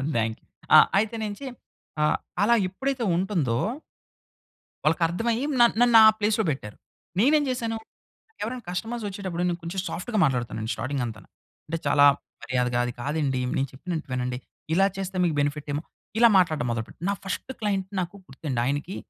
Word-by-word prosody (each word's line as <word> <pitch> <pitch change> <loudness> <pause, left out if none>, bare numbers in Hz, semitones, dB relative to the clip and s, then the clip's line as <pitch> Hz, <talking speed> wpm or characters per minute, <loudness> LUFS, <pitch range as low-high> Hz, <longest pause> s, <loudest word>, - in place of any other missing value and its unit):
Then 110 -1 +1 0.4
ఆహ్, - - +8
అయితే 220 +3 +1
నించి, 210 +6 -5 0.6
ఆహ్, 150 - +3 0.3
అలా 235 +3 +5
ఎప్పుడైతే 265 +6 -2
ఉంటుందో. 170 - 0 1.3
వాళ్ళకి 165 +3 +3
అర్థమయ్యి 230 +9 -1
న - - +8 0.2
నన్ను 240 -1 +7
ఆ - - +10
ప్లేస్‌లో 215 +1 +2
పెట్టారు. 105 -7 -6 0.4
నేనేం 295 +7 +4
చేశాను, 230 -3 -2 0.7
ఎవరైనా 240 +3 -4
కస్టమర్స్ 225 +6 -3
వచ్చేటప్పుడు, 190 -3 -4
నేను 175 -1 -1
కొంచెం 170 +3 -3
సాఫ్ట్‌గా 180 +8 -3
మాట్లాడుతానుండి. 120 -5 -1
స్టార్టింగ్ 130 +4 -2
అంతా. 110 -2 -6 0.5
అంటే, 165 +2 -2
చాలా 145 0 +6 0.4
మర్యాదగా 125 -1 0
"అది 120 - -4
కాదండి, 140 -2 -1 0.2
నేను 135 - 0
చెప్పినట్టు 165 +3 -5
వినండి, 125 0 -2 0.4
ఇలా 195 +3 +5
చేస్తే 190 -1 -4
మీకు 165 -3 0
బెనిఫిట్ 145 +1 -2
ఏమొ" 150 - -2 0.4
ఇలా 235 - +8
మాట్లాడటం 155 -8 +2
మొదలు 115 -1 -2
పెట్ట. - - -16
నా - - +2
ఫర్స్ట్ 195 +6 -4
క్లయింట్ 195 -3 0
నాకు 175 0 -3
గుర్తండి, 135 -2 -4
ఆయనకి 145 +8 -2
170 Hz, 155 wpm, -26 LUFS, 135-210 Hz, 1.3 s, ఆ